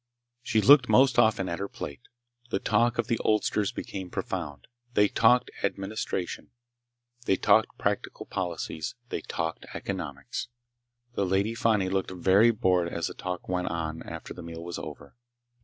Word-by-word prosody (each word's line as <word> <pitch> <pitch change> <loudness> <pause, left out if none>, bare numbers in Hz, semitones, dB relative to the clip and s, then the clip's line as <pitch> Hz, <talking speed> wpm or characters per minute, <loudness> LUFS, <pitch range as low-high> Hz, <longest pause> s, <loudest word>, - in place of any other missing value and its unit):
She 115 -2 +1
looked 130 0 +7
most 130 +3 +5
often 110 -5 +3
at 85 - -3
her 100 - -2
plate. 70 - -7 0.5
The - - 0
talk 120 +4 +2
of 120 - +1
the 115 0 0
oldsters 105 -1 +1
became 95 -2 -6
profound. 70 -4 -4 0.3
They 105 0 +5
talked 125 +4 +4
administration. 95 -2 -3 0.8
They 95 - +3
talked - - +3
practical - - -2
politics. 85 -4 -4
They - - -3
talked 80 0 -4
economics. 75 -8 -4 0.7
The 100 - 0
Lady 100 +4 +1
Fani 110 -4 +2
looked 95 0 -1
very 95 +5 +4
bored 90 -6 +2
as 85 0 -2
the - - -7
talk 90 -1 -5
went 90 -1 -1
on 80 -1 -3
after 80 0 -7
the 90 - -9
meal 85 0 -8
was 85 -1 -5
over. 70 - -9
95 Hz, 155 wpm, -28 LUFS, 85-110 Hz, 0.8 s, looked